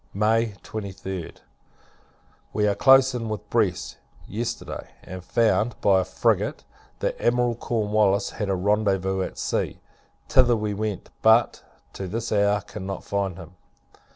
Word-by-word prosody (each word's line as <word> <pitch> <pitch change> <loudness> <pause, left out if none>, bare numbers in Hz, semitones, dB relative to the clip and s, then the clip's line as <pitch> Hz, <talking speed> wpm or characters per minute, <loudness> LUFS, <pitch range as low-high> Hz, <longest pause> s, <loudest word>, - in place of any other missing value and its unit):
May 110 +1 +2
23d. 95 -4 -6 1.2
We 105 - +1
were 105 - +3
close 135 +3 +6
in 115 -2 -3
with 105 -1 -5
Brest, - - 0 0.3
yesterday; 115 +4 -4 0.2
and 95 0 -8
found, 115 +2 +1
by 95 -2 +4
a - - +1
frigate, - - 0 0.4
that - - -2
Admiral 120 0 +2
Cornwallis 105 -4 +1
had 105 -2 -4
a 95 - +2
rendezvous 95 -1 +1
at - - -4
sea. - - -2 0.5
Thither 125 -3 +4
we 105 -1 -2
went; 105 -2 -4
but, 110 +1 +4 0.3
to 95 - -5
this 115 +5 -4
hour, 100 -1 +2
cannot 100 -1 -6
find 100 -3 -2
him. 85 -2 -10
105 Hz, 135 wpm, -24 LUFS, 95-115 Hz, 1.2 s, close